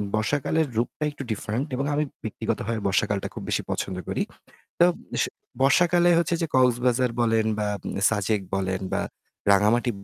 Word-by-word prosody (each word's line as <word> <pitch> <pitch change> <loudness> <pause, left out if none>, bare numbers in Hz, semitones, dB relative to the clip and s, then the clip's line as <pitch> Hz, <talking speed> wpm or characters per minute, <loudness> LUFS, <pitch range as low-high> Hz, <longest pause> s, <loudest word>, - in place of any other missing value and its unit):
বর্ষাকালের 145 +7 +1
রূপটা 120 +6 -1
একটু 145 - -7
ডিফারেন্ট 110 +6 -2
এবং 135 +2 -1
আমি 150 - +2 0.2
ব্যক্তিগতভাবে 115 +1 -2
বর্ষাকালটা 100 +1 +1
খুব - - -7
বেশি - - +1
পছন্দ 95 - -2
করি। - - -1 0.6
তো 175 - +8 0.4
স - - +3 0.4
বর্ষাকালে 175 +5 +4
হচ্ছে 170 0 +1
যে - - +1
কক্সবাজার 125 0 +3
বলেন, 115 -2 +2
বা 105 - 0 0.4
সাজেক 105 -1 0
বলেন 95 -1 -1
বা - - +1 0.5
রাঙামাটি 105 +5 +4
120 Hz, 145 wpm, -25 LUFS, 105-140 Hz, 0.6 s, তো